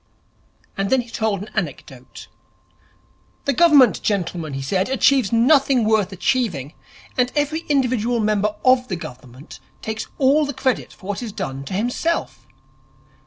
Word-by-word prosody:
And 195 Hz, 0 st, -2 dB
then 265 Hz, -1 st, +3 dB
he 235 Hz, -1 st, -14 dB
told 210 Hz, -3 st, -1 dB
an 215 Hz, -, -12 dB
anecdote. 135 Hz, -, -6 dB, 1.2 s
'The 280 Hz, -, +1 dB
Government, 290 Hz, -3 st, +5 dB
gentlemen,' 175 Hz, -6 st, -2 dB
he 135 Hz, -, -4 dB
said, 185 Hz, -, 0 dB
'achieves 265 Hz, -4 st, +3 dB
nothing 255 Hz, +1 st, +4 dB
worth 215 Hz, -3 st, +2 dB
achieving, 180 Hz, -, -1 dB, 0.5 s
and 250 Hz, 0 st, +2 dB
every 295 Hz, +2 st, 0 dB
individual 245 Hz, -4 st, +1 dB
member 210 Hz, -1 st, 0 dB
of 255 Hz, 0 st, +4 dB
the 185 Hz, -, -3 dB
Government 130 Hz, -2 st, -11 dB, 0.2 s
takes 220 Hz, 0 st, -4 dB
all 280 Hz, +3 st, +4 dB
the 285 Hz, -2 st, -4 dB
credit 260 Hz, 0 st, -1 dB
for 185 Hz, -, -17 dB
what 205 Hz, +3 st, -4 dB
is 235 Hz, -3 st, -5 dB
done 135 Hz, -7 st, -5 dB
to 185 Hz, -, -7 dB
himself. 245 Hz, -, -2 dB
220 Hz, 145 wpm, -21 LUFS, 190-260 Hz, 1.2 s, Government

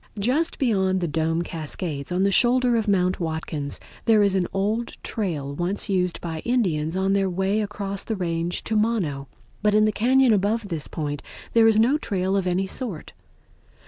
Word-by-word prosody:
Just 260 Hz, +11 st, +1 dB
beyond 190 Hz, -7 st, +1 dB
the 175 Hz, -, -1 dB
Dome 160 Hz, +2 st, 0 dB
Cascades, 155 Hz, -2 st, -5 dB
on 180 Hz, +2 st, +1 dB
the 200 Hz, -, +3 dB
shoulder 245 Hz, +3 st, +3 dB
of 225 Hz, -1 st, 0 dB
Mount 185 Hz, -2 st, +2 dB
Watkins, 160 Hz, -3 st, -3 dB, 0.3 s
there 220 Hz, -3 st, +5 dB
is 200 Hz, -1 st, +2 dB
an 185 Hz, -2 st, +1 dB
old 215 Hz, +4 st, -1 dB
trail 155 Hz, -10 st, -3 dB
once 180 Hz, +7 st, -2 dB
used 180 Hz, -2 st, 0 dB
by 165 Hz, -2 st, -4 dB
Indians 175 Hz, -9 st, 0 dB
on 190 Hz, +1 st, +1 dB
their 195 Hz, -1 st, +2 dB
way 190 Hz, +4 st, 0 dB
across 200 Hz, -1 st, -4 dB
the 220 Hz, -, -3 dB
range 170 Hz, -2 st, -2 dB
to 225 Hz, -, -2 dB
Mono, 195 Hz, -11 st, 0 dB, 0.3 s
but 210 Hz, 0 st, +3 dB
in 215 Hz, 0 st, +5 dB
the 215 Hz, -, +1 dB
cañon 255 Hz, +3 st, +4 dB
above 205 Hz, +2 st, 0 dB
this 160 Hz, -4 st, -3 dB
point 145 Hz, -3 st, -4 dB, 0.3 s
there 230 Hz, -1 st, +6 dB
is 220 Hz, -1 st, +4 dB
no 250 Hz, +7 st, +4 dB
trail 190 Hz, -6 st, -1 dB
of 195 Hz, -2 st, 0 dB
any 180 Hz, +2 st, +1 dB
sort. 195 Hz, -, -5 dB
195 Hz, 180 wpm, -24 LUFS, 170-220 Hz, 0.3 s, there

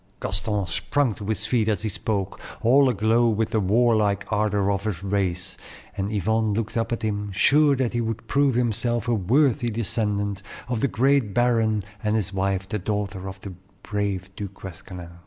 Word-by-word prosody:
Gaston 100 Hz, +1 st, -1 dB
sprung 130 Hz, +8 st, 0 dB
to 100 Hz, -, -8 dB
his 105 Hz, -1 st, -1 dB
feet 110 Hz, -1 st, +1 dB
as 105 Hz, 0 st, -1 dB
he 110 Hz, -, 0 dB
spoke, 100 Hz, -1 st, -3 dB, 0.2 s
all 135 Hz, +3 st, +5 dB
aglow 115 Hz, +1 st, +3 dB
with 110 Hz, 0 st, 0 dB
the 110 Hz, -, +2 dB
warlike 105 Hz, -1 st, +2 dB
ardor 105 Hz, -2 st, +1 dB
of 100 Hz, +1 st, -2 dB
his 100 Hz, -4 st, -3 dB
race, 95 Hz, -2 st, -2 dB, 0.4 s
and 100 Hz, +2 st, -2 dB
Yvonne 110 Hz, +1 st, +1 dB
looked 110 Hz, 0 st, -3 dB
up 115 Hz, 0 st, -1 dB
at 115 Hz, -, -2 dB
him, 105 Hz, -1 st, -2 dB
sure 145 Hz, +9 st, +4 dB
that 130 Hz, -3 st, -1 dB
he 120 Hz, -, 0 dB
would 115 Hz, 0 st, -3 dB
prove 140 Hz, -1 st, +2 dB
himself 120 Hz, 0 st, 0 dB
a 120 Hz, -, +2 dB
worthy 120 Hz, +5 st, +2 dB
descendant 105 Hz, -3 st, -1 dB, 0.3 s
of 125 Hz, -3 st, -1 dB
the -, -, +3 dB
great 130 Hz, -4 st, +2 dB
baron 115 Hz, -4 st, +2 dB, 0.2 s
and 105 Hz, 0 st, +1 dB
his 100 Hz, -3 st, -1 dB
wife, 95 Hz, 0 st, -1 dB
the 105 Hz, 0 st, -2 dB
daughter 100 Hz, -1 st, -3 dB
of 95 Hz, 0 st, -10 dB
the 100 Hz, -, -7 dB, 0.3 s
brave 100 Hz, -3 st, -2 dB
Du 100 Hz, -, -4 dB
Guesclin. 95 Hz, -2 st, -9 dB
105 Hz, 180 wpm, -24 LUFS, 100-115 Hz, 0.4 s, all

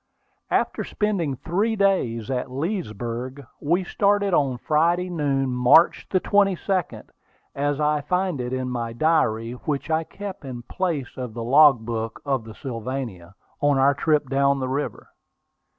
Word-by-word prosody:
After -, -, 0 dB
spending 195 Hz, -10 st, -1 dB
three 200 Hz, -, -1 dB
days 135 Hz, -, +1 dB
at 125 Hz, 0 st, -2 dB
Leesburg, 130 Hz, -, -4 dB
we 170 Hz, +5 st, +1 dB
started 200 Hz, +1 st, +1 dB
on 135 Hz, -6 st, +2 dB
Friday 170 Hz, +6 st, +1 dB
noon, 140 Hz, -5 st, 0 dB
March 125 Hz, +7 st, +4 dB
22, 195 Hz, -1 st, +1 dB, 0.5 s
as 145 Hz, +1 st, -1 dB
I 150 Hz, 0 st, +1 dB
find 180 Hz, -1 st, -1 dB
it 125 Hz, 0 st, -4 dB
in 130 Hz, 0 st, -2 dB
my 120 Hz, -2 st, -3 dB
diary, 115 Hz, -6 st, +1 dB
which 140 Hz, +4 st, -4 dB
I 160 Hz, +1 st, +2 dB
kept 200 Hz, +2 st, -8 dB
in 125 Hz, -3 st, -7 dB
place 160 Hz, -5 st, -3 dB
of 125 Hz, -4 st, -6 dB
the 115 Hz, -, -4 dB
logbook 120 Hz, -4 st, +3 dB
of 135 Hz, -5 st, -1 dB
the 110 Hz, -1 st, -10 dB
Sylvania, 115 Hz, -7 st, -6 dB, 0.2 s
on 145 Hz, -1 st, +3 dB
our 135 Hz, +1 st, +4 dB
trip 150 Hz, 0 st, +1 dB
down 140 Hz, +1 st, +2 dB
the 130 Hz, -, -2 dB
river. 140 Hz, +3 st, -4 dB
140 Hz, 140 wpm, -24 LUFS, 125-170 Hz, 0.5 s, March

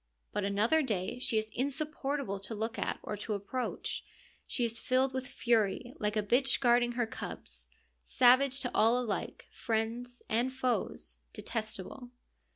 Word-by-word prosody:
But 205 Hz, -, 0 dB
another 210 Hz, +10 st, +3 dB
day 215 Hz, -4 st, -1 dB
she 235 Hz, -3 st, 0 dB
is 215 Hz, 0 st, -1 dB
insupportable 280 Hz, -4 st, -2 dB
to 200 Hz, +3 st, -6 dB
look 225 Hz, +2 st, -3 dB
at -, -, -1 dB
or 210 Hz, -, -3 dB
to 210 Hz, +1 st, -2 dB
approach. 220 Hz, +6 st, -3 dB, 0.4 s
She 245 Hz, -, +1 dB
is 230 Hz, 0 st, -2 dB
filled 260 Hz, +1 st, +2 dB
with 260 Hz, -1 st, -3 dB
fury, 235 Hz, 0 st, +1 dB
like 210 Hz, 0 st, 0 dB
a 210 Hz, -, +2 dB
bitch 250 Hz, +6 st, +3 dB
guarding 240 Hz, -1 st, +4 dB
her 240 Hz, 0 st, +1 dB
cubs: 225 Hz, -, -7 dB, 0.3 s
savage 260 Hz, +2 st, +4 dB
to 245 Hz, -, -1 dB
all 230 Hz, +3 st, +5 dB
alike, 230 Hz, -5 st, -3 dB
friends 235 Hz, +2 st, -2 dB
and 240 Hz, +4 st, +1 dB
foes, 255 Hz, -2 st, -2 dB
detestable. 220 Hz, +3 st, -4 dB
240 Hz, 150 wpm, -32 LUFS, 215-255 Hz, 0.4 s, all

